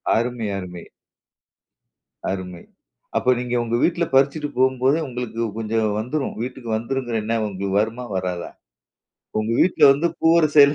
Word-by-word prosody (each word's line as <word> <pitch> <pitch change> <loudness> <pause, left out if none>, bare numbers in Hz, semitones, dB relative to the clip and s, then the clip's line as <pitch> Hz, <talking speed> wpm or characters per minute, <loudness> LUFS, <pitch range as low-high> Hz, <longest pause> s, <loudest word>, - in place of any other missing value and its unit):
அருமை! 120 -1 -1
அருமை! 90 -2 -7 1.5
அருமை! 90 -2 -5 0.6
அப்ப 125 - +3
நீங்க 125 0 -2
உங்க 115 0 -1
வீட்ல 170 0 +2
பறிச்சிட்டு 140 +2 +3
போம்போதே 130 +3 +3
உங்களுக்கு 120 -2 -4
கொஞ்சம் 110 0 0
வந்துரும். 135 +5 -3
வீட்டுக்கு 125 -1 -6
வந்துரும்ங்கற 120 0 -2
எண்ணம் 110 0 0
உங்களுக்கு 100 0 -2
வருமா? 115 +3 -2
வராதா? 90 -2 -3 0.9
உங்க 110 +1 -2
வீட்ல 185 - +2
வந்து 160 +5 0
பூவரச 160 -2 +4
எல 145 - 0
120 Hz, 130 wpm, -22 LUFS, 110-135 Hz, 1.5 s, பூவரச